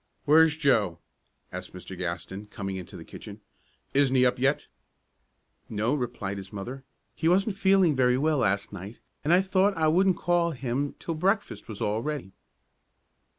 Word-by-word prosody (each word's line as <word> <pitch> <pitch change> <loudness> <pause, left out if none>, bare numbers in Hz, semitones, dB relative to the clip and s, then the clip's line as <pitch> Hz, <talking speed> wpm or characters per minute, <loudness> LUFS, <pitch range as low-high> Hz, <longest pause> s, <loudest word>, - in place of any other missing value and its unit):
"Where's 160 +1 +6
Joe?" 110 - +2 0.5
asked 90 0 -7
Mr. 90 +1 -8
Gaston, 90 +3 -5
coming 95 -2 -5
into 90 -2 -8
the - - -10
kitchen. - - -10 0.5
"Isn't 135 -1 +3
he 125 -1 +5
up 125 - +2
yet?" 135 +3 +1 1.0
"No," 110 +4 0
replied 120 -7 -3
the 95 -1 -9
mother. 125 +7 -6 0.3
"He 160 - 0
wasn't 195 +3 +2
feeling 190 -5 +4
very 125 -1 +3
well 150 +1 +2
last 100 -3 0
night, 100 +4 -8 0.3
and 150 - +1
I 180 +2 +5
thought 190 0 +2
I 160 -1 +3
wouldn't 185 +3 +3
call 175 -1 +1
him 135 +2 -2
till 165 - -4
breakfast 195 +6 -1
was 110 -3 -7
all 105 +2 0
ready." 145 -7 -4
130 Hz, 160 wpm, -27 LUFS, 105-160 Hz, 1.0 s, Where's